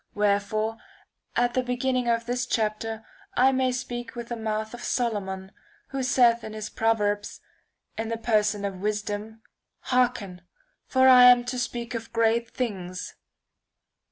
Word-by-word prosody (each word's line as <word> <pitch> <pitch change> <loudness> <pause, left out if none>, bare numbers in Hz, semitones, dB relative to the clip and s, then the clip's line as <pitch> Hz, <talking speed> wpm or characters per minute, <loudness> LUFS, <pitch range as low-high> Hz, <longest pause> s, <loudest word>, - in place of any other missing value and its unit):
Wherefore, 210 +2 0 0.6
at 245 0 +2
the 255 - +2
beginning 250 0 -1
of 230 0 +1
this 245 0 -2
chapter, 220 0 -2 0.3
I 260 +2 +5
may 260 -1 +1
speak 245 -1 -5
with 235 -1 -6
the 240 - -2
mouth 220 0 -3
of 240 - -8
Solomon, 195 -7 -2 0.4
who 270 0 -3
saith 240 -2 +4
in 215 - -7
his 215 -1 -6
Proverbs^ 205 -2 0 0.6
in 225 0 -2
the 230 - -2
person 210 -3 +1
of 190 -2 -5
wisdom: 210 +1 -3 0.2
' - - -57
Hearken! 235 -8 +1 0.5
for 260 0 +4
I 250 -1 +9
am 245 -1 +8
to 250 0 -3
speak 240 0 -4
of 230 -1 -5
great 230 +1 +2
things.' 185 -8 -4
225 Hz, 150 wpm, -26 LUFS, 210-245 Hz, 0.6 s, I